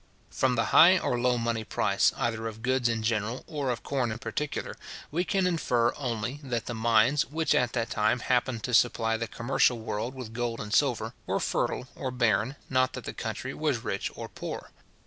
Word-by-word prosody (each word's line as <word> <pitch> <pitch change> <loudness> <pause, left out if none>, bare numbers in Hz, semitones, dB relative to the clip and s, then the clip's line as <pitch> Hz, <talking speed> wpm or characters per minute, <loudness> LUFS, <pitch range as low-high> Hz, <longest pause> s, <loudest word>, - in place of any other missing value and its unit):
From 130 -1 +1
the - - +2
high 185 +3 +8
or 120 -8 0
low 125 0 +2
money 115 -1 -1
price, 100 -1 +2
either 115 -3 -1
of 110 0 -8
goods 130 -1 +2
in 115 -1 -1
general, 115 +2 -1
or 145 -5 -3
of 120 -1 -2
corn 130 -5 -1
in 110 - -4
particular, 145 +3 -4 0.4
we 170 +4 +1
can 190 +2 +1
infer 125 -9 +1
only, 125 0 -3
that 125 -5 -3
the 120 - -4
mines, 115 +4 +3
which 160 +3 0
at 125 -2 +2
that 115 -2 -1
time 105 +3 +2
happened 125 -2 0
to 125 - -3
supply 115 -1 +3
the 115 0 -3
commercial 125 +1 +1
world 110 +3 -4
with 125 -4 -7
gold 120 -1 -2
and 105 0 -5
silver, 120 -3 +2
were - - 0
fertile 125 - -1
or 130 - -3
barren, 120 0 +1
not 130 0 +2
that - - -6
the - - -5
country - - -4
was - - -1
rich - - -2
or - - -6
poor. - - -7
120 Hz, 200 wpm, -28 LUFS, 115-130 Hz, 0.4 s, high